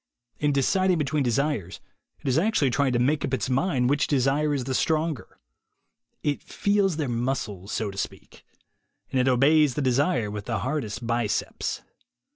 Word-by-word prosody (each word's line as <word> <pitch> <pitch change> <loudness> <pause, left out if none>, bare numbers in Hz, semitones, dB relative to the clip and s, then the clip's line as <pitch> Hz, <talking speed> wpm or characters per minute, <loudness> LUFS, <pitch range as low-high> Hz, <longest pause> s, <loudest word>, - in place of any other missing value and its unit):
In 150 -1 +2
deciding 185 +7 +2
between 150 0 0
desires, 125 - -1 0.4
it - - -8
is 130 +3 +3
actually 165 - +2
trying 140 0 +1
to - - +2
make 140 +5 +1
up - - 0
its 130 +1 -3
mind 130 -2 +1
which 145 +2 +2
desire 140 +2 +1
is 140 -3 -1
the 130 +1 -3
stronger. 155 -1 -1 0.9
It 145 -1 -1
feels 200 -4 0
their 150 -4 -1
muscles, 115 -5 -3
so 105 -2 -2
to 100 - -7
speak. - - -7 0.7
And 135 - +1
it 125 - +1
obeys 140 +2 +4
the - - -1
desire 130 - +1
with 105 -1 -6
the 115 -2 -1
hardest 120 -3 -3
biceps. 115 -2 -2
135 Hz, 165 wpm, -25 LUFS, 120-150 Hz, 0.9 s, obeys